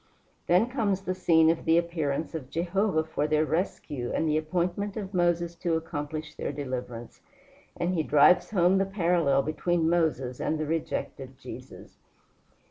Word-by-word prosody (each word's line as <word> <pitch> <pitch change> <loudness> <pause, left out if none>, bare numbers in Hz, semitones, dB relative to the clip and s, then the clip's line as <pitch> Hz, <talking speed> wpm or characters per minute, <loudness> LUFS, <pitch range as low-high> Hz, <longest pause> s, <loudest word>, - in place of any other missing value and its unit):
Then 180 +7 +4
comes 215 -7 -1
the 185 -1 -2
scene 165 -3 +4
of 165 - -3
the 165 +1 +4
appearance 165 -3 -1
of 145 -6 -6
Jehovah 175 0 0
for 155 -2 -2
their 155 0 +2
rescue 150 -6 -2
and 160 - 0
the 150 - +1
appointment 180 +6 -1
of 200 -2 -5
Moses 175 -1 +1
to 170 -1 0
accomplish 155 -1 -4
their - - -4
deliverance, 125 -4 -6 0.6
and 175 +1 0
he 165 - +1
drives 150 +3 +4
home 190 -1 +3
the 195 - +2
parallel 170 -8 +2
between 160 +2 0
Moses 150 -7 0
and 160 - -1
the 155 - -2
rejected 145 -4 -4
Jesus. 135 - -11
165 Hz, 155 wpm, -27 LUFS, 150-180 Hz, 0.6 s, Then